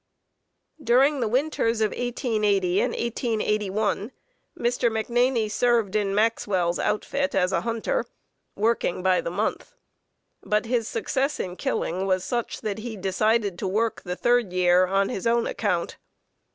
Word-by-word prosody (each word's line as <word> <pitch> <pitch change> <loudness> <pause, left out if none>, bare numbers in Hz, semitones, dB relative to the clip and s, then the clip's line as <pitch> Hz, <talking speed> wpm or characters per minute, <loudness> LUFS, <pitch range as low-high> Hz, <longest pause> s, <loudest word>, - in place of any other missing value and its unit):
During 270 +4 +4
the 235 - 0
winters 240 -2 0
of 215 -1 +1
1880 210 -7 0
and - - +1
1881 215 -2 -1 0.5
Mr. 240 0 +1
McNaney 235 +2 +1
had 215 - -4
served 230 -3 +1
in 200 -2 +1
Maxwell's 200 -5 +1
outfit 275 +6 -1
as 185 -1 +2
a - - +1
hunter, 230 - -2 0.5
working 210 -4 0
by 185 -1 +3
the - - -4
month, 210 - -3 0.7
but 210 +2 0
his 230 -1 0
success 290 - -1
in 180 -1 -4
killing 185 +1 -2
was 185 -1 +1
such 235 +4 -3
that 215 -1 -3
he 220 -1 -6
decided 200 0 0
to 195 - -2
work 220 +4 0
the 180 -1 -4
third 240 -2 +2
year 180 0 +4
on 195 +1 +1
his 195 - -3
own 235 0 +2
account. 180 -6 -2
215 Hz, 145 wpm, -25 LUFS, 195-235 Hz, 0.7 s, During